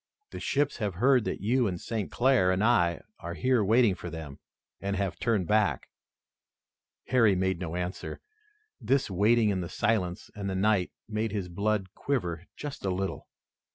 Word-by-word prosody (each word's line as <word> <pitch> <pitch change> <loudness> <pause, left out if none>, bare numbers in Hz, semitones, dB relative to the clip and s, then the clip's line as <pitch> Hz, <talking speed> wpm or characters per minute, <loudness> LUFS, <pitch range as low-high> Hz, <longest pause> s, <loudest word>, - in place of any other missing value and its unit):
"The - - -6
ships 145 0 0
have 105 -5 -2
heard 125 +3 +4
that - - -3
you 120 +3 +2
and 90 -3 -3
St. 110 -1 -3
Clair 120 -7 +3
and 95 +2 +1
I 90 -8 +3 0.2
are 85 +1 -6
here 125 -1 +2
waiting 110 +1 +4
for 90 -1 -7
them 80 -4 -8 0.4
and 100 0 -2
have 95 -1 -2
turned 110 -6 +1
back." 105 0 +1 1.2
Harry 115 -6 +4
made 95 -1 0
no 85 -2 -4
answer. 90 +1 -4 0.6
This 135 -6 +1
waiting 110 +4 +3
in 95 -2 0
the 85 - -5
silence 95 -3 -1
and 100 -1 -4
the 95 - -2
night 95 -1 +2 0.2
made 110 0 -2
his 100 -4 -3
blood 100 +1 -1
quiver 90 - -2
just 145 -1 -7
a 95 - 0
little. 95 +1 -3
100 Hz, 170 wpm, -28 LUFS, 90-115 Hz, 1.2 s, heard